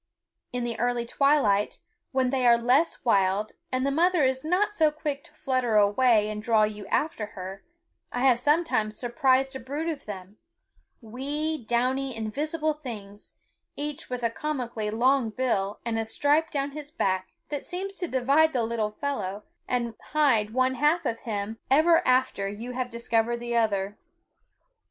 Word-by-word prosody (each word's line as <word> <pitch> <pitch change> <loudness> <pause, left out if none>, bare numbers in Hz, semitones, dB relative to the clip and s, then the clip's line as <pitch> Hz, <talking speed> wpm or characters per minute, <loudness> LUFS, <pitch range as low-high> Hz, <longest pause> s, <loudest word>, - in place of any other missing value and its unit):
In 245 0 -2
the 235 -2 -3
early 240 0 0
twilight, 235 -7 +2 0.3
when 260 -1 +1
they 260 -2 +2
are 235 0 +7
less 255 +8 +2
wild 200 -1 +2 0.2
and 255 0 0
the 275 - +1
mother 345 +2 +3
is 260 0 +1
not 375 +6 +1
so 315 -6 +4
quick 300 -2 -4
to - - -14
flutter 255 -4 0
away 210 +1 +4
and 210 0 -4
draw 220 -1 +3
you 210 -2 -3
after 225 -4 -1
her, 190 +1 -7 0.5
I 245 - -2
have 255 -3 +4
sometimes 270 -7 +1
surprised 260 +2 +1
a - - -4
brood 285 +6 -4
of 310 -7 -4
them, 195 0 -8 0.6
wee, 285 +6 -3
downy, 255 +3 0
invisible 305 +8 -1
things, 215 -9 -9 0.4
each 295 0 -5
with 250 -1 -4
a 230 - +1
comically 240 -6 -3
long 245 +2 +2
bill 210 -4 -1
and 225 -1 -1
a 225 - -1
stripe 290 +7 +2
down 280 0 -2
his 295 0 -7
back 190 - -1 0.2
that 290 -2 -3
seems 385 +2 -4
to 355 - -2
divide 280 +4 +3
the 245 -3 +1
little 225 -2 -1
fellow 210 -8 -3 0.2
and 240 -2 -1 0.2
hide 260 -9 +3
one 255 +2 +2
half 300 +5 +2
of 230 -3 -1
him 215 0 -4
even 325 +4 +5
after 255 -6 +2
you 225 +5 -6
have 250 0 -3
discovered 235 0 0
the 240 0 -4
other. 205 -3 0
250 Hz, 165 wpm, -27 LUFS, 220-285 Hz, 0.6 s, are